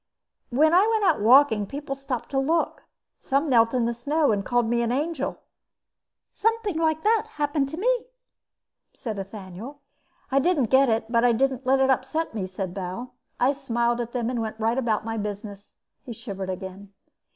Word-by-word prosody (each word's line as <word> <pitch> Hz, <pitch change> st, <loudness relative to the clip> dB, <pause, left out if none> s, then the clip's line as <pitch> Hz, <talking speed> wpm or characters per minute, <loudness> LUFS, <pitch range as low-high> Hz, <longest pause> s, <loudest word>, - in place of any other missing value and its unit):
"When 310 Hz, +6 st, +3 dB
I 380 Hz, +5 st, +5 dB
went 445 Hz, -2 st, +1 dB
out 365 Hz, -, +3 dB
walking 225 Hz, -3 st, +5 dB
people 280 Hz, +2 st, -5 dB
stopped 270 Hz, -3 st, -5 dB
to 270 Hz, -, +1 dB
look. 320 Hz, +5 st, 0 dB, 0.3 s
Some 275 Hz, +4 st, 0 dB
knelt 230 Hz, -4 st, +4 dB
in 245 Hz, -2 st, +2 dB
the 235 Hz, -, 0 dB
snow 290 Hz, +5 st, +1 dB
and 200 Hz, -2 st, 0 dB
called 245 Hz, +3 st, +1 dB
me 235 Hz, +1 st, +1 dB
an 235 Hz, 0 st, 0 dB
angel." 290 Hz, +2 st, -2 dB, 0.9 s
"Something 440 Hz, -5 st, 0 dB
like 315 Hz, -1 st, +1 dB
that 440 Hz, 0 st, +2 dB
happened 290 Hz, -2 st, 0 dB
to 315 Hz, -, -7 dB
me," -, -, +1 dB, 0.9 s
said 220 Hz, -6 st, -5 dB
Ethaniel. 195 Hz, +6 st, -8 dB, 0.5 s
"I 275 Hz, -, +4 dB
didn't 280 Hz, -, +1 dB
get 265 Hz, 0 st, +5 dB
it 225 Hz, 0 st, -1 dB
but 235 Hz, 0 st, +3 dB
I 245 Hz, -1 st, +5 dB
didn't 260 Hz, +1 st, 0 dB
let 265 Hz, +1 st, +4 dB
it 265 Hz, 0 st, +4 dB
upset 270 Hz, +5 st, -1 dB
me," 200 Hz, -4 st, -3 dB
said 185 Hz, -1 st, -5 dB
Bal. 195 Hz, +7 st, -6 dB, 0.3 s
"I 260 Hz, +3 st, +3 dB
smiled 240 Hz, -3 st, 0 dB
at 235 Hz, 0 st, -5 dB
them 240 Hz, -1 st, -1 dB
and 240 Hz, -2 st, -2 dB
went 220 Hz, -1 st, -4 dB
about 225 Hz, -1 st, 0 dB
my 225 Hz, 0 st, -3 dB
business." 205 Hz, -1 st, -6 dB, 0.3 s
He 250 Hz, -3 st, -7 dB
shivered 195 Hz, -4 st, -6 dB
again. 190 Hz, +1 st, -7 dB
245 Hz, 180 wpm, -25 LUFS, 220-290 Hz, 0.9 s, I